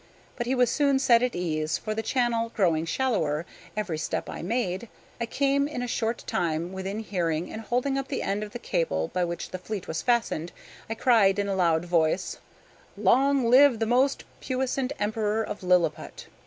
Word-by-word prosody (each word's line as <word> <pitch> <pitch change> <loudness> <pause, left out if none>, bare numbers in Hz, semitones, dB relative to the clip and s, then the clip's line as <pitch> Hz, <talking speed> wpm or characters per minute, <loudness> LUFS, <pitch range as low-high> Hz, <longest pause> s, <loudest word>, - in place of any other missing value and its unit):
But 240 -2 -3
he 260 - +1
was 250 -2 +3
soon 280 -2 +3
set 235 -3 +4
at 250 -1 0
ease, 155 -3 -1
for, 215 - -4
the 220 - -2
channel 230 -1 0
growing 165 -5 +2
shallower 165 - 0 0.3
every 185 -7 -2
step - - -3
I - - -6
made, 210 +1 -2 0.3
I 235 - -2
came 280 +2 +1
in 250 -5 -4
a - - -3
short 230 0 -2
time 170 +1 -1
within 190 +3 -4
hearing, 175 -5 -2
and 220 - -5
holding 250 +4 0
up 270 - -5
the 275 - -3
end 200 +1 -1
of 210 -1 -6
the - - -5
cable 80 - -1
by 180 - -1
which 170 0 -4
the 185 - -5
fleet 200 0 -5
was 160 0 -3
fastened, 230 -9 0 0.4
I 225 - -2
cried 220 -5 +4
in 200 0 0
a 200 - 0
loud 170 -2 +2
voice: 170 +1 +1 0.6
"Long 260 +5 +3
live 255 +1 +6
the 225 - 0
most 255 +4 +2 0.2
puissant 260 0 -1
Emperor 215 +1 0
of 210 - -6
Lilliput!" 180 -4 0
215 Hz, 190 wpm, -27 LUFS, 175-245 Hz, 0.6 s, live